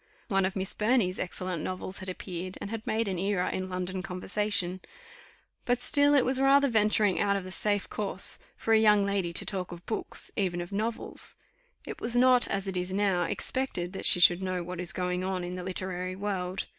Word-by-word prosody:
One 195 Hz, -2 st, +2 dB
of 190 Hz, -, -2 dB
Miss 190 Hz, -1 st, 0 dB
Burney's 210 Hz, -4 st, +1 dB
excellent 180 Hz, -2 st, -4 dB
novels 185 Hz, +1 st, -3 dB
had 185 Hz, -, -5 dB
appeared, 185 Hz, 0 st, -6 dB
and 200 Hz, -, -6 dB
had 225 Hz, -1 st, -6 dB
made 225 Hz, 0 st, 0 dB
an 185 Hz, -3 st, -2 dB
era 195 Hz, -1 st, 0 dB
in 185 Hz, 0 st, -3 dB
London 185 Hz, 0 st, -3 dB
conversation; 185 Hz, 0 st, -1 dB, 0.8 s
but 245 Hz, 0 st, +1 dB
still 285 Hz, +3 st, +4 dB
it 270 Hz, -, +4 dB
was 260 Hz, +1 st, +2 dB
rather 280 Hz, +1 st, +5 dB
venturing 210 Hz, -3 st, +2 dB
out 200 Hz, -1 st, +2 dB
of 195 Hz, -, -2 dB
the 185 Hz, -, -8 dB
safe 205 Hz, +1 st, 0 dB
course 195 Hz, -2 st, +1 dB, 0.2 s
for 225 Hz, -, 0 dB
a 220 Hz, -, +6 dB
young 210 Hz, -2 st, +5 dB
lady 195 Hz, -3 st, -1 dB
to -, -, +1 dB
talk 185 Hz, -3 st, -3 dB
of 175 Hz, 0 st, -10 dB
books, 220 Hz, -, 0 dB
even 180 Hz, -3 st, 0 dB
of 175 Hz, +2 st, -6 dB
novels; 220 Hz, +3 st, -2 dB, 0.5 s
it -, -, -7 dB
was 235 Hz, +1 st, -2 dB
not, 250 Hz, 0 st, +5 dB
as 195 Hz, 0 st, -2 dB
it 190 Hz, -1 st, -3 dB
is 180 Hz, +1 st, -3 dB
now, 190 Hz, -3 st, +1 dB
expected 185 Hz, -2 st, -2 dB
that -, -, -1 dB
she 180 Hz, -, +5 dB
should 175 Hz, +1 st, +6 dB
know 185 Hz, -2 st, -2 dB
what 180 Hz, 0 st, -6 dB
is 180 Hz, +1 st, -2 dB
going 180 Hz, -1 st, -2 dB
on 185 Hz, -1 st, -2 dB
in 175 Hz, +1 st, -5 dB
the 180 Hz, -, -5 dB
literary 185 Hz, 0 st, -3 dB
world. 190 Hz, -2 st, -3 dB
190 Hz, 205 wpm, -28 LUFS, 180-210 Hz, 0.8 s, a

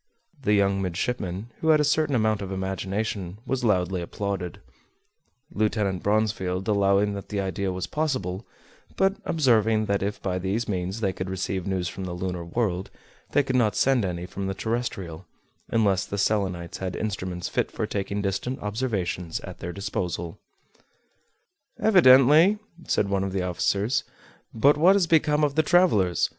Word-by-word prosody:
The 105 Hz, -, +2 dB
young 100 Hz, -1 st, +2 dB
midshipman, 95 Hz, +2 st, -3 dB
who 160 Hz, -, -3 dB
had 155 Hz, -1 st, +6 dB
a -, -, +3 dB
certain 150 Hz, -1 st, +2 dB
amount 110 Hz, -3 st, +1 dB
of 95 Hz, -1 st, -5 dB
imagination, 95 Hz, 0 st, -3 dB
was 130 Hz, -1 st, -2 dB
loudly 95 Hz, -4 st, +1 dB
applauded; 95 Hz, 0 st, -4 dB, 0.9 s
Lieutenant 105 Hz, -, 0 dB
Bronsfield 100 Hz, -3 st, 0 dB
allowing 100 Hz, 0 st, +3 dB
that 100 Hz, -1 st, -7 dB
the 105 Hz, -, -2 dB
idea 95 Hz, 0 st, -2 dB
was 90 Hz, 0 st, -3 dB
possible, 125 Hz, -, -2 dB, 0.5 s
but 195 Hz, +1 st, +2 dB
observing 115 Hz, -8 st, +3 dB
that 100 Hz, -1 st, 0 dB
if 100 Hz, +1 st, -2 dB
by 90 Hz, -1 st, -2 dB
these 100 Hz, +6 st, -2 dB
means 95 Hz, +2 st, -3 dB
they 95 Hz, -3 st, 0 dB
could 95 Hz, 0 st, -5 dB
receive 95 Hz, 0 st, -3 dB
news 95 Hz, -2 st, -1 dB
from 95 Hz, +1 st, -5 dB
the 90 Hz, -, -4 dB
lunar 90 Hz, -1 st, -3 dB
world 95 Hz, 0 st, -2 dB, 0.4 s
they 145 Hz, -, +4 dB
could 130 Hz, -1 st, -2 dB
not 110 Hz, -4 st, +2 dB
send 130 Hz, -4 st, +3 dB
any 90 Hz, -2 st, -3 dB
from 95 Hz, +1 st, -5 dB
the 95 Hz, -, -3 dB
terrestrial, 95 Hz, -7 st, -4 dB, 0.4 s
unless 100 Hz, -4 st, +2 dB
the 100 Hz, -, -4 dB
Selenites 95 Hz, -5 st, -1 dB
had 95 Hz, -1 st, -3 dB
instruments 95 Hz, -4 st, -3 dB
fit -, -, -1 dB
for -, -, -3 dB
taking 100 Hz, 0 st, -3 dB
distant 100 Hz, +7 st, -2 dB
observations 100 Hz, -6 st, -2 dB
at -, -, -9 dB
their 85 Hz, -, -5 dB
disposal. 90 Hz, -1 st, -4 dB, 1.4 s
"Evidently," 160 Hz, -, +6 dB, 0.3 s
said 100 Hz, -, +1 dB
one 100 Hz, -1 st, 0 dB
of 95 Hz, -1 st, -3 dB
the 95 Hz, -2 st, -1 dB
officers; 100 Hz, +6 st, 0 dB, 0.5 s
"but 140 Hz, +6 st, +4 dB
what 180 Hz, +6 st, +6 dB
has 195 Hz, -3 st, +3 dB
become 155 Hz, -2 st, +3 dB
of 145 Hz, -2 st, +2 dB
the 155 Hz, -, +3 dB
travelers? 150 Hz, -, +3 dB
100 Hz, 160 wpm, -25 LUFS, 95-120 Hz, 1.4 s, had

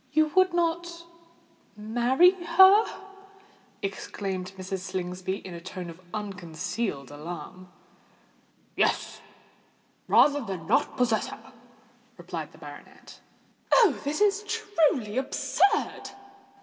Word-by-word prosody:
"You 310 Hz, 0 st, +3 dB
would 370 Hz, 0 st, +5 dB
not 340 Hz, 0 st, -2 dB, 0.7 s
marry 240 Hz, +11 st, +4 dB
her?" 380 Hz, +3 st, +6 dB, 1.0 s
exclaimed 190 Hz, -1 st, -4 dB
Mrs. 190 Hz, 0 st, -4 dB
Slingsby, 185 Hz, 0 st, -4 dB
in 185 Hz, -, -7 dB
a 170 Hz, -, -8 dB
tone 180 Hz, -1 st, -7 dB
of 165 Hz, +2 st, -15 dB
unconcealed 185 Hz, -, -4 dB
alarm. 175 Hz, +4 st, -8 dB, 1.1 s
"Yes—rather 290 Hz, 0 st, -1 dB
than 190 Hz, -8 st, -6 dB
not -, -, +1 dB
possess 235 Hz, -3 st, +1 dB
her," -, -, -11 dB, 0.6 s
replied -, -, -6 dB
the -, -, -17 dB
baronet. -, -, -13 dB, 0.5 s
"Oh! 435 Hz, -, +5 dB
this 295 Hz, +6 st, -2 dB
is 415 Hz, 0 st, +3 dB
truly 315 Hz, -, 0 dB
absurd!" 395 Hz, +9 st, 0 dB
230 Hz, 95 wpm, -27 LUFS, -, 1.1 s, her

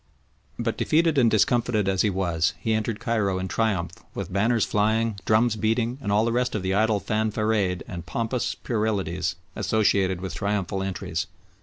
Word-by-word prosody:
But -, -, -2 dB
defeated 160 Hz, -2 st, +3 dB
and 120 Hz, -3 st, +5 dB
discomfited 110 Hz, -1 st, +2 dB
as 95 Hz, -1 st, +2 dB
he 105 Hz, -, +2 dB
was, 90 Hz, -2 st, 0 dB
he 110 Hz, -, 0 dB
entered 110 Hz, 0 st, -1 dB
Cairo 100 Hz, -5 st, 0 dB
in 95 Hz, 0 st, -3 dB
triumph 95 Hz, -5 st, 0 dB, 0.2 s
with -, -, -5 dB
banners 110 Hz, +3 st, +2 dB
flying, 110 Hz, 0 st, +1 dB
drums 110 Hz, +1 st, +3 dB
beating, 115 Hz, +4 st, 0 dB
and 100 Hz, -, -2 dB
all 105 Hz, +2 st, +3 dB
the 115 Hz, -, +1 dB
rest 125 Hz, 0 st, 0 dB
of 105 Hz, -, -2 dB
the 95 Hz, 0 st, 0 dB
idle 110 Hz, +1 st, +2 dB
fanfaronade 105 Hz, -4 st, 0 dB
and 85 Hz, -1 st, -6 dB
pompous 115 Hz, +7 st, -2 dB
puerilities 95 Hz, -6 st, -1 dB, 0.2 s
associated 100 Hz, -4 st, +1 dB
with 95 Hz, 0 st, -5 dB
triumphal 100 Hz, -2 st, -1 dB
entries. 95 Hz, -1 st, -3 dB
105 Hz, 165 wpm, -25 LUFS, 95-115 Hz, 0.2 s, and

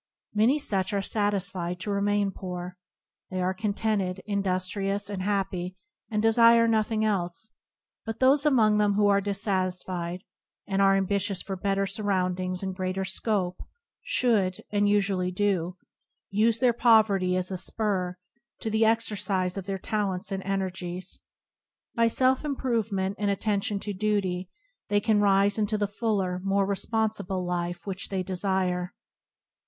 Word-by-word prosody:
Many 225 Hz, +7 st, +4 dB
such 195 Hz, -9 st, -1 dB
are 200 Hz, -1 st, 0 dB
satisfied 190 Hz, -4 st, -1 dB
to 205 Hz, -, -2 dB
remain 200 Hz, 0 st, +1 dB
poor. 180 Hz, -1 st, -6 dB, 0.5 s
They 185 Hz, -, -3 dB
are 185 Hz, +1 st, +1 dB
contented, 200 Hz, -2 st, -1 dB
industri 195 Hz, -1 st, -1 dB
ous, 205 Hz, +1 st, -2 dB
and 195 Hz, -2 st, -3 dB
happy, 190 Hz, -2 st, -2 dB, 0.3 s
and 210 Hz, -1 st, -1 dB
desire 230 Hz, +1 st, +6 dB
nothing 220 Hz, -1 st, +1 dB
else; 190 Hz, 0 st, -2 dB, 0.5 s
but 225 Hz, -1 st, -5 dB
those 270 Hz, +3 st, +4 dB
among 220 Hz, -8 st, +4 dB
them 205 Hz, -1 st, +3 dB
who 205 Hz, 0 st, +3 dB
are 200 Hz, 0 st, +4 dB
dissatisfied, 185 Hz, -3 st, -2 dB, 0.4 s
and 195 Hz, 0 st, 0 dB
are 195 Hz, 0 st, +5 dB
ambitious 195 Hz, 0 st, 0 dB
for 195 Hz, -, -4 dB
better 195 Hz, +1 st, 0 dB
surroundings 185 Hz, -2 st, -1 dB
and 190 Hz, -1 st, -2 dB
greater 185 Hz, 0 st, -2 dB
scope, 190 Hz, -3 st, -1 dB, 0.4 s
should, 220 Hz, -, +1 dB
and 205 Hz, 0 st, +2 dB
usually 195 Hz, -3 st, +1 dB
do, 185 Hz, -2 st, 0 dB, 0.5 s
use 215 Hz, +3 st, +3 dB
their 245 Hz, 0 st, +3 dB
poverty 215 Hz, -6 st, +4 dB
as 185 Hz, +1 st, -1 dB
a 185 Hz, -, -2 dB
spur 185 Hz, -3 st, -1 dB, 0.4 s
to 225 Hz, -, -2 dB
the 220 Hz, +1 st, +3 dB
exercise 210 Hz, -5 st, +1 dB
of 195 Hz, -1 st, -5 dB
their 195 Hz, -1 st, -2 dB
talents 195 Hz, -1 st, -2 dB
and 195 Hz, 0 st, -2 dB
energies. 185 Hz, -2 st, -3 dB, 0.7 s
By 230 Hz, 0 st, +3 dB
self 255 Hz, +4 st, +2 dB
improve 250 Hz, -6 st, -1 dB
ment 190 Hz, 0 st, -1 dB
and 205 Hz, -1 st, +1 dB
attention 200 Hz, 0 st, 0 dB
to 205 Hz, -, -4 dB
duty, 190 Hz, -3 st, -1 dB, 0.4 s
they 205 Hz, -, +3 dB
can 210 Hz, 0 st, +2 dB
rise 200 Hz, +1 st, +3 dB
into 215 Hz, 0 st, +1 dB
the 205 Hz, -, +1 dB
fuller, 200 Hz, -4 st, -1 dB
more 195 Hz, 0 st, +2 dB
responsible 200 Hz, -2 st, -1 dB
life 175 Hz, 0 st, -3 dB
which 190 Hz, -1 st, -4 dB
they 190 Hz, -2 st, -1 dB
desire. 185 Hz, -1 st, -1 dB
200 Hz, 145 wpm, -27 LUFS, 185-215 Hz, 0.7 s, desire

